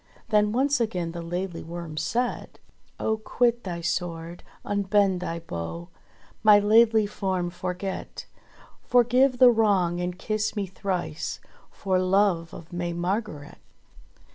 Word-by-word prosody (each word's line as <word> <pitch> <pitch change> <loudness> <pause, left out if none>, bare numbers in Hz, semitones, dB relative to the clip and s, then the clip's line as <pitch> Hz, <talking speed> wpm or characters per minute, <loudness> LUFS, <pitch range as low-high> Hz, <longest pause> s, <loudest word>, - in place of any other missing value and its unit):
Then 210 -1 +3
once 275 +4 +2
again 180 -7 -1
the 170 0 -6
Laidly 175 +1 -4
Worm 170 -1 -7
said: 240 +11 -2 0.4
*'0h 220 0 -1
quit 240 0 +1
thy 175 -3 -5
sword, 170 0 -3 0.2
unbend 200 -2 +2
thy 170 -2 -4
bow, 85 - -6 0.5
My 210 -1 +7
laidly 220 +1 +5
form 190 -4 -2
forget. 180 +2 -5 0.6
Forgive 250 +2 +3
the 250 -1 +8
wrong 195 -6 +2
and 180 0 -3
kiss 215 +2 -2
me 205 -2 -1
thrice 185 -4 -4 0.3
For 190 -2 -1
love 185 -3 +2
of 165 +2 -11
May 175 0 -2
Margret." 175 -4 -3
190 Hz, 125 wpm, -26 LUFS, 175-215 Hz, 0.6 s, the